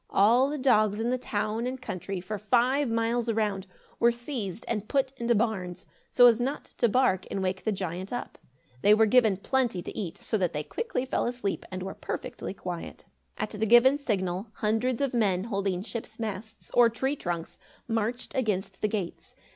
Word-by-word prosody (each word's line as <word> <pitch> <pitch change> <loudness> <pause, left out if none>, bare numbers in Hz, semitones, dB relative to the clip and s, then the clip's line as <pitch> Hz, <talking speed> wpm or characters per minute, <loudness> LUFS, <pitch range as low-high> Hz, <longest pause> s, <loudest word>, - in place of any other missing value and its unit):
All 235 +7 +4
the 300 - -2
dogs 215 -6 +3
in 235 +2 0
the 255 - +1
town 215 +1 -2
and 260 +1 -4
country, 190 -1 -4
for 200 +4 -5
five 250 +6 +2
miles 230 +1 0
around, 210 -4 0 0.3
were 235 - +5
seized 235 - -5
and 215 -2 -2
put 270 0 +1
into 235 -1 +1
barns, 195 -5 -1 0.2
so 245 - +6
as 240 -1 +6
not 275 +4 -3
to 235 - +4
bark 205 -6 +2
and 195 - -2
wake 185 0 -2
the 220 - +2
giant 185 -1 -4
up. 245 - -5 0.4
They 210 +1 +6
were 220 +1 +5
given 220 -3 +4
plenty 235 -4 0
to - - -7
eat, 180 -6 -4
so 220 - -2
that 180 -2 0
they 150 0 -2
quickly 465 - -3
fell 260 - 0
asleep 240 -5 -3
and 185 -1 -5
were 190 - -5
perfectly - - -5
quiet. 175 -3 -6 0.3
At 215 - -3
the 210 0 -3
given 250 +5 +6
signal, 190 -6 -1
hundreds 225 +4 0
of 275 -2 0
men 195 -6 +2
holding 195 -4 -1
ship's 220 0 -6
masts, 220 0 -6
or 240 -1 +6
tree 265 +5 -1
trunks, 175 - -4 0.3
marched 230 +1 -2
against 210 -6 -1
the - - +2
gates. 200 -5 -5
220 Hz, 185 wpm, -28 LUFS, 195-245 Hz, 0.4 s, so